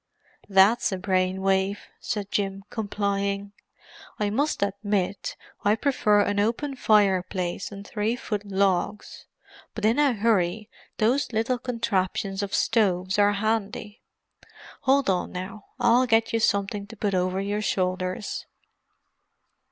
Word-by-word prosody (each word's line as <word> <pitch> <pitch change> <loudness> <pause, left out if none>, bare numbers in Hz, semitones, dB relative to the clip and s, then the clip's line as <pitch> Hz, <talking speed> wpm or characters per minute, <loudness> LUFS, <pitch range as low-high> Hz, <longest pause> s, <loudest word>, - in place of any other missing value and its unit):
"That's 200 +5 +4
a 190 - -2
brain 185 0 0
wave," 195 +1 +1 0.2
said 205 -2 -4
Jim, 195 -1 -1
complying. 200 -2 -2 0.7
"I 205 -1 0
must 285 +1 0
admit 200 -1 -2 0.3
I 205 +1 +4
prefer 215 -5 +2
an 205 0 0
open 240 +7 0
fireplace 190 -5 +1
and 200 0 -9
three 215 +3 -1
foot 210 -4 -4
logs—but 200 +2 -3
in 230 +6 +3
a 285 -3 +4
hurry 210 -1 0 0.3
those 245 +5 +1
little 230 +3 0
contraptions 200 -5 -1
of 200 0 -2
stoves 190 -4 +1
are 205 0 +5
handy. 210 0 -2 0.8
Hold 275 +1 +3
on 185 -2 0
now—I'll 230 +6 0
get 225 -1 +2
you 230 - +2
something 200 -1 0
to 225 +1 -12
put 200 -1 -1
over 185 +1 0
your 205 +2 -2
shoulders." 185 -1 -2
205 Hz, 120 wpm, -25 LUFS, 195-225 Hz, 0.8 s, are